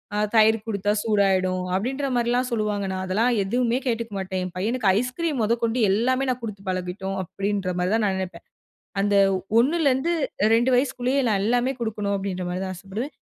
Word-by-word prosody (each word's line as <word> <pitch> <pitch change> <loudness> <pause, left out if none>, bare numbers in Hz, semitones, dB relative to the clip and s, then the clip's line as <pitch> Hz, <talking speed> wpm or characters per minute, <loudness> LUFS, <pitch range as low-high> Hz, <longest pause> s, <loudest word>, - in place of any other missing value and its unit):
அ - - 0 0.2
தயிர் 220 0 +6
குடுத்தா 205 -1 0
சூடாயிடும்!" 190 -4 +2
அப்டின்ற 265 +7 -1
மாரிலாம் 245 +2 +1
சொல்லுவாங்க. 210 -3 -1
நான் 185 0 -3
அதெல்லாம் 225 +6 +1
எதுவுமே 240 +4 0
கேட்டுக்க 230 -2 -2
மாட்டேன். 190 -1 -3
என் 180 - -7
பையனுக்கு 215 +1 0
ஐஸ்கிரீம் 260 +2 -2
மொதகொண்டு 230 +2 0
எல்லாமே 255 +6 +1
நான் 250 -1 -4
குடுத்து 205 -3 -6
பழகிட்டோம் 185 +1 -3
அப்டின்ற 195 0 -2
மாரி 180 +2 0
தான் 225 - +1
நான் 190 -1 0
நினைப்பேன். 180 -2 -6 0.6
அந்த 205 0 +2 0.4
1 290 +8 +2
லருந்து 275 +6 +2 0.4
2 240 +3 +2
வயசுக்குள்ளயே 260 +1 0
நான் 195 -2 +1
எல்லாமே 245 +3 +1
குடுக்கணும் 210 -3 -1
அப்டின்ற 185 -2 -4
மாரி 180 +1 -3
தான் 185 0 -5
ஆசப்படுவேன். 200 - -6
215 Hz, 165 wpm, -24 LUFS, 195-245 Hz, 0.6 s, தயிர்